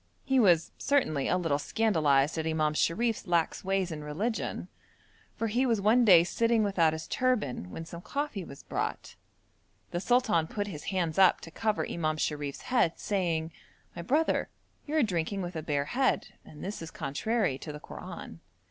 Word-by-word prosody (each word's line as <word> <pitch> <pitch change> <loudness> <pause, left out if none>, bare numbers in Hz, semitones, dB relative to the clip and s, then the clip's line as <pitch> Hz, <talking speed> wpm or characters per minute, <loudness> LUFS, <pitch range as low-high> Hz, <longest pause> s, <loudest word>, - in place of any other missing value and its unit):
He 265 -1 +3
was 175 -7 +4
certainly 155 - +1
a 180 - +2
little 165 -5 0
scandalised 155 -8 +2
at 160 - -2
Imam 155 -1 +1
Sharif's 220 +10 0
lax 170 -2 +1
ways 190 -2 0
in 150 -1 -5
religion, 200 +11 -3 0.7
for 230 - -2
he 235 +4 +1
was 235 -5 +2
one 220 +5 +4
day 175 -5 +8
sitting 230 +4 +2
without 170 -6 +2
his 160 0 -5
turban 210 - 0
when 165 - -7
some 170 +1 -9
coffee 280 -4 -3
was 140 -4 -11
brought. - - -4 0.8
The 175 - -1
sultan 220 -7 +2
put 205 +3 -3
his 160 -8 -7
hands 175 -3 -1
up 190 -1 +6
to 165 - -10
cover 215 +4 -1
Imam 155 -2 -1
Sharif's 145 -2 -2
head, 240 -10 +1
saying: 170 -5 -1 0.4
'My - - -5
brother, 295 - +1 0.4
you 300 - -2
are 310 - +4
drinking 190 -1 -1
with 175 0 -6
a 160 - -2
bare 145 -2 -1
head, 260 - 0
and 150 - -12
this 200 0 -5
is 165 - -6
contrary 145 - -1
to 155 - -7
the 150 - -8
Koran.' - - -9
175 Hz, 175 wpm, -29 LUFS, 155-225 Hz, 0.8 s, day